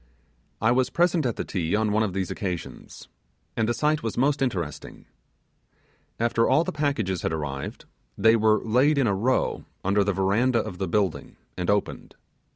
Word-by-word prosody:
I 110 +2 +3
was 125 0 +2
present 170 -4 +2
at 120 - -2
the - - -4
Ti 85 0 -1
on 110 0 +1
one 110 +1 +2
of 110 -3 0
these 95 -2 -2
occasions, 90 -6 -6 0.5
and 110 0 0
the - - +2
sight 150 0 +1
was 115 - -4
most 140 +3 +2
interesting. 90 - -4 1.1
After 115 0 +2
all 160 - +4
the - - -3
packages 140 - -1
had - - -1
arrived, 75 -4 -5 0.3
they 110 0 +5
were 110 -1 +3
laid 130 +7 +3
in 135 - +3
a 100 - +2
row 120 +7 0 0.2
under 100 +1 +3
the 100 - 0
verandah 110 +6 +1
of 90 - -8
the 95 - -1
building 95 -1 -1 0.2
and 90 -1 -3
opened. 100 0 -1
110 Hz, 175 wpm, -25 LUFS, 95-125 Hz, 1.1 s, they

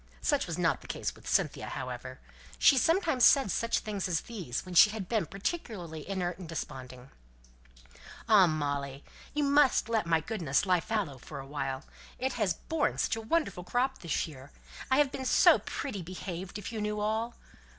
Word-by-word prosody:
Such 290 -6 +1
was 170 - -3
not 170 -2 +1
the - - -13
case - - -3
with - - -10
Cynthia, - - +1
however. - - -6 0.4
She 280 - +6
sometimes 320 - +2
said 270 -7 +6
such 230 0 +1
things 205 -3 -3
as 170 -3 0
these, 185 - -5
when 185 - -8
she 195 +5 +8
had 210 -3 -5
been 215 -7 0
particularly 190 - -5
inert 180 -2 -2
and 175 -4 -8
desponding: 130 -5 -7 1.2
"Ah, 205 -5 +7
Molly, 145 -3 -2 0.3
you 295 - +1
must 280 -4 +4
let 220 -6 +1
my 165 -1 +3
goodness 165 - 0
lie 180 -2 +3
fallow 190 -12 -2
for - - -9
a 135 - -7
while! 135 -1 -4 0.3
It 260 +1 -1
has 205 -8 0
borne 320 - -1
such - - +1
a 225 - -5
wonderful 225 - -1
crop 250 +8 0
this 165 -2 -1
year. 140 -3 -11 0.4
I 260 - +4
have 290 -2 +3
been 265 - -5
so 255 - +6
pretty 230 -9 -5
behaved 180 +2 -6
if 210 - -6
you 220 -2 -4
knew 210 0 -2
all!" 220 +3 -1
195 Hz, 180 wpm, -30 LUFS, 160-235 Hz, 1.2 s, she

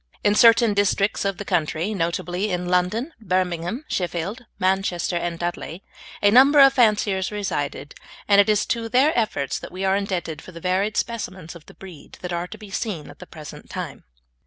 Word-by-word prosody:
In 205 - +4
certain 230 0 +6
districts 200 0 +1
of 195 -2 -1
the 205 - -6
country, 175 +2 -1
notably 180 +2 -2
in 180 -1 -2
London, 185 - 0
Birmingham, 185 - -2
Sheffield, 185 +7 -3
Manchester, 185 -1 0
and 170 0 -2
Dudley, 175 +1 -5 0.4
a 205 - +6
number 275 +5 +7
of 275 -1 +8
fanciers 210 -6 +2
resided, 145 -8 -3 0.3
and 200 -1 +7
it 205 - 0
is 210 -2 +2
to 230 -1 -2
their 265 +7 +3
efforts 180 - -1
that - - -9
we 185 +2 -4
are 190 0 +3
indebted 185 -5 -3
for 185 - -13
the 170 - -9
varied 190 +4 0
specimens 185 -8 -4
of 165 - -14
the - - -15
breed 185 -6 -13
that 180 -1 -5
are 170 +1 -2
to 220 - -10
be 210 -2 -12
seen 190 -7 -4
at - - -18
the 180 - -11
present 155 -4 -11
time. - - -6
190 Hz, 185 wpm, -23 LUFS, 175-215 Hz, 0.4 s, of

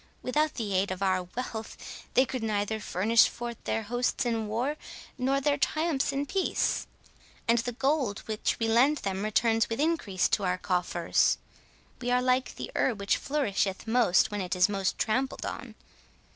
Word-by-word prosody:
Without 300 +4 +1
the 215 -5 -3
aid 190 +1 +2
of 185 +1 -3
our 185 -1 +2
wealth, 220 +4 -6 0.4
they 260 - +6
could 255 -1 -4
neither 215 0 -1
furnish 215 +3 +3
forth 235 -1 -7
their 225 - -1
hosts 245 +4 -1
in 225 -2 -1
war, 240 +7 -1 0.4
nor 265 +2 +1
their 285 +1 +1
triumphs 310 -1 +1
in 280 +1 -1
peace, 380 +5 0 0.6
and 235 +1 +4
the 240 +2 -2
gold 265 -4 0
which 215 -1 -1
we 225 - +1
lend 255 +7 +4
them 195 -4 -3
returns 225 +1 +2
with 225 - -3
increase 290 - +1
to 205 - 0
our 180 -1 +1
coffers. 180 -2 +1 0.6
We 245 - -2
are 250 0 +3
like 255 +1 +1
the - - -6
herb 235 -6 +1
which 200 0 +1
flourisheth 205 -9 -1
most 225 -6 +3
when 205 -1 -2
it 180 -1 -2
is 180 - +5
most 195 -2 -1
trampled 260 +5 -1
on. - - -6
230 Hz, 170 wpm, -28 LUFS, 200-260 Hz, 0.6 s, they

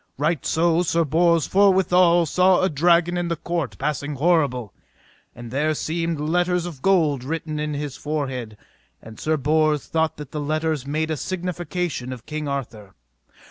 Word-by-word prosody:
Right 150 +3 0
so 165 +1 +2
Sir 170 -1 +1
Bors 165 +2 +3
forthwithal 185 -3 +4
saw 180 +4 +3
a 185 - +2
dragon 170 +3 +3
in 175 -1 -1
the 170 - -1
court 165 -3 -3
passing 145 0 -2
horrible, 135 - +1 0.6
and 120 -1 -9
there 150 +4 0
seemed 165 +1 -2
letters 175 +3 0
of 160 -7 -8
gold 155 -8 +2
written 155 +1 -4
in 150 -1 -2
his 145 -2 -5
forehead; 130 -7 -4 0.4
and 110 -1 -13
Sir 155 0 0
Bors 150 0 +1
thought 160 -1 -1
that 150 -2 -9
the 150 - -4
letters 155 -1 -1
made 155 +2 -1
a 155 - -1
signification 175 -6 -3
of 125 -3 -8
King 155 -1 -4
Arthur. 110 -8 -5
155 Hz, 160 wpm, -23 LUFS, 145-170 Hz, 0.6 s, forthwithal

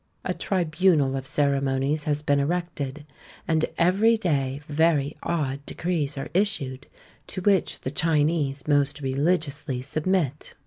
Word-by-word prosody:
A - - 0
tribunal 160 -6 +2
of 135 0 -4
ceremonies 140 +1 0
has 150 0 -1
been 145 -1 +2
erected; 150 -2 -2 0.4
and 160 -1 +2
every 200 +7 +4
day 140 -9 0
very 150 -1 +2
odd 140 -4 -2
decrees 155 -5 -2
are 135 - -4
issued, 140 -9 -1 0.4
to 185 - -5
which 195 -1 +1
the 130 - -3
Chinese 150 -2 +1
most 145 0 +2
religiously 140 -1 0
submit. 150 +2 -1
150 Hz, 125 wpm, -25 LUFS, 140-170 Hz, 0.4 s, every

